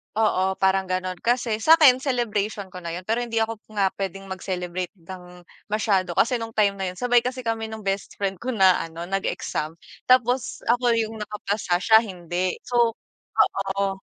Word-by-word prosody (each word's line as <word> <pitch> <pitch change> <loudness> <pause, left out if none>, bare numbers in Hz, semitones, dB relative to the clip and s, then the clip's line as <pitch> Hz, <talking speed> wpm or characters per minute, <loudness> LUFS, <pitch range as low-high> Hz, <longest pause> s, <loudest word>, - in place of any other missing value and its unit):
Oo, 190 -3 +2
parang 190 0 +2
gano'n. 185 -1 -2
Kasi 235 -2 0
sa'kin 305 -2 +7
celebration 215 -6 -1
ko 180 - -8
na 170 -1 -6
'yon 180 - -6
pero 225 +4 0
hindi 240 -1 -4
ako 225 -1 -1 0.2
nga 195 -2 +3
puwedeng 195 0 -5
mag-celebrate 180 -1 -4
ng 180 0 -12 0.2
masyado 200 -4 0
kasi 240 +1 +2
nung 225 0 -7
time 205 -2 +4
na 190 -1 -3
'yon - - -14
sabay 245 -1 +4
kasi 250 +1 -4
kami 225 -1 -2
ng 220 -1 -8
bestfriend 195 0 -3
ko, 235 - -8
na 190 -2 +5
ano, 165 +1 -6
nag-exam 175 -4 -3 0.3
tapos 250 0 +2
ako 245 -1 +2
yung 225 -1 -2
nakapasa, 210 -3 -2
siya 220 +2 +7
hindi. 180 -3 -3
So 235 -2 +2 0.4
oo. 195 0 +1
200 Hz, 165 wpm, -24 LUFS, 185-230 Hz, 0.4 s, sa'kin